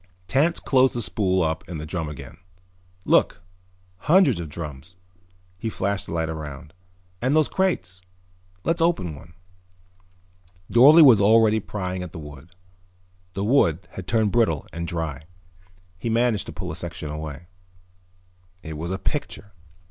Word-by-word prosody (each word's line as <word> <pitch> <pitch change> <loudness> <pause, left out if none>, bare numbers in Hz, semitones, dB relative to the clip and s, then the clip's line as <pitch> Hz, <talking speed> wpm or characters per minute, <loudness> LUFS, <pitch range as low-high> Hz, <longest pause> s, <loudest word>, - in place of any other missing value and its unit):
Tance 155 - +2
closed 130 -1 +3
the 120 - -1
spool 95 -4 0
up 80 0 -2
in 85 - -5
the 75 - -6
drum 80 -1 -4
again. 75 - -10 0.7
"Look, 85 - +2 0.5
hundreds 170 - +3
of 85 -2 -6
drums." 75 +1 -8 0.6
He 115 - -3
flashed 100 -1 -2
the - - -7
light 80 -1 -1
around. 75 -1 -7 0.5
"And 130 +4 +1
those 155 -2 +4
crates. 95 - -1 0.6
Let's 165 0 0
open 165 - +1
one." 80 +3 -14 1.4
Dorle 150 +7 +8
was 115 -7 +7
already 110 +1 +5
prying 95 -3 -4
at 90 -2 -7
the - - -8
wood. 75 +2 -11 0.8
The 100 - -2
wood 95 - +2
had 95 -2 -8
turned 110 -3 +1
brittle 110 -12 +1
and 85 +1 -4
dry. 80 -5 -4 0.8
He 115 - -3
managed 115 -2 +1
to - - -6
pull - - -6
a - - -6
section 80 -3 -6
away. 75 +1 -7 1.2
It 80 -1 -7
was 85 +2 -4
a 95 - -2
picture. 105 -4 -4
90 Hz, 150 wpm, -24 LUFS, 80-115 Hz, 1.4 s, Dorle